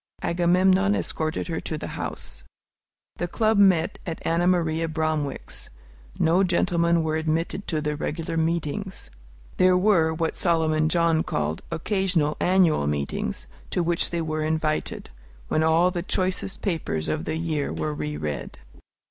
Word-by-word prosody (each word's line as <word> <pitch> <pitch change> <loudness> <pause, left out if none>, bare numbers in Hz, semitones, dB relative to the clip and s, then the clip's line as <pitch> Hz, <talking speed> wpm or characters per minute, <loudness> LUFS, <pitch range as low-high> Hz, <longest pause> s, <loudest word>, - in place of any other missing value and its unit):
Agamemnon 185 +3 +3
escorted 155 -4 -2
her 165 -2 -2
to 155 - -4
the - - -6
house. 60 - -4 0.7
The 175 - -2
Club 215 +3 +1
met 185 -5 +4
at 165 -2 -5
Ann 165 +1 +1
Maria 165 -2 +1
Bromwick's. 155 -3 -3 0.5
No 175 +4 +3
gentlemen 170 -2 +2
were 155 0 0
admitted 165 +5 -2
to 155 -3 -1
the 150 0 -1
regular 160 +2 -3
meetings. 165 - -2 0.5
There 185 0 +5
were 180 -5 +3
what 160 0 -2
Solomon 155 -2 +2
John 165 -2 +2
called 75 - -2
"occasional 170 -3 0
annual 180 - +3
meetings," 70 -1 -2 0.2
to 180 - 0
which 170 0 +1
they 170 -1 -2
were 155 0 -2
invited, 155 - -2 0.4
when 155 - +2
all 165 +3 +4
the 175 -1 -2
choicest 185 +1 -2
papers 140 - -2
of 155 - -2
the 155 - -2
year 160 -3 -2
were 80 -1 -2
re 75 0 -4
read. 75 -3 -5
165 Hz, 145 wpm, -25 LUFS, 155-180 Hz, 0.7 s, There